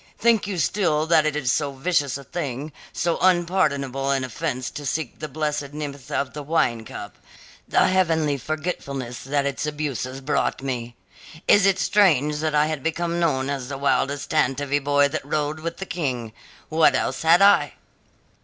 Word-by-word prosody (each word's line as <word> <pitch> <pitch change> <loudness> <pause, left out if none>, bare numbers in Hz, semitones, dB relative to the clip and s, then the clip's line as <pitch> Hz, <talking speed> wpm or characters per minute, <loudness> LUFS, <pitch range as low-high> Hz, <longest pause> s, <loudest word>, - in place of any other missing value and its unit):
Think 230 -3 +3
you 195 -3 -3
still 160 -3 +1
that 160 -2 +4
it 150 - -1
was 135 -5 +1
so 145 -2 0
vicious 140 -2 0
a 140 - -10
thing, 145 -1 -4 0.2
so 170 0 -1
unpardonable 155 -7 +1
an 135 -1 +1
offence 130 0 -3
to 150 - -7
seek 145 -1 -3
the 155 - -4
blessed 150 -1 -3
nepenthe 145 -3 -6
of 140 -2 -1
the 150 - -5
wine 125 -7 0
cup, 100 - -9 0.5
the - - +3
heavenly 160 -6 +2
forgetfulness 140 -5 -4
that 140 +1 0
its 140 +2 -2
abuses 140 -3 -3
brought 135 -1 -1
me? 120 -3 -4 0.5
Is 200 -1 +6
it 195 -1 +3
strange 150 -9 +3
that 155 0 -1
I 155 +1 +2
became 170 +4 -2
known 135 -6 +1
as 135 -3 -3
the 140 - -4
wildest 140 0 0
tantivy 145 -1 +1
boy 145 0 +4
that - - -3
rode 150 +1 -2
with 170 +1 -5
the 195 - -5
King? 125 - -3 0.4
What 160 0 +4
else - - -1
had 170 +4 +5
I?" 200 -8 +5
150 Hz, 170 wpm, -23 LUFS, 135-165 Hz, 0.5 s, Is